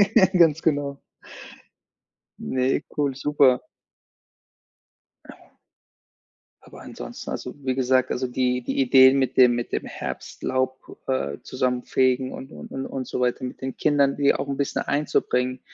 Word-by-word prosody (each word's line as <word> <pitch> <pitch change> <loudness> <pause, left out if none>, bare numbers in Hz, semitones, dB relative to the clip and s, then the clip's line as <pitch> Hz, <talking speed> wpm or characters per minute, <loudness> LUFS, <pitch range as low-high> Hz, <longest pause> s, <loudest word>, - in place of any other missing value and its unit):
Ja, 190 - +8
ganz 165 -4 +3
genau. 145 -3 -1 1.4
Ne, 130 +2 0
cool, 145 -3 -1
super. 140 -3 +3 1.6
Ja. - - -17 1.1
Aber - - -14
ansonsten, - - -8
also, - - -5
wie 130 -2 -2
gesagt, 130 0 +1
also, 130 +1 -1
die 125 0 -1
die - - -2
Ideen 130 +1 +6
mit 130 -1 -1
dem 125 -1 +7
mit 120 0 -4
dem - - -2
Herbstlaub, 130 0 -4
äh, 100 - -2
zusammenfegen 130 0 0
und 135 - -9
und - - -11
und 135 0 -4
und 130 -2 -5
so - - -4
weiter 125 +1 0
mit 125 - -7
den 130 0 -5
Kindern, 140 -2 +2
die 140 -1 +3
auch 140 0 -4
'n 140 - -2
bisschen 140 0 -1
einzubringen, 130 -3 0
130 Hz, 140 wpm, -24 LUFS, 125-140 Hz, 1.6 s, Ja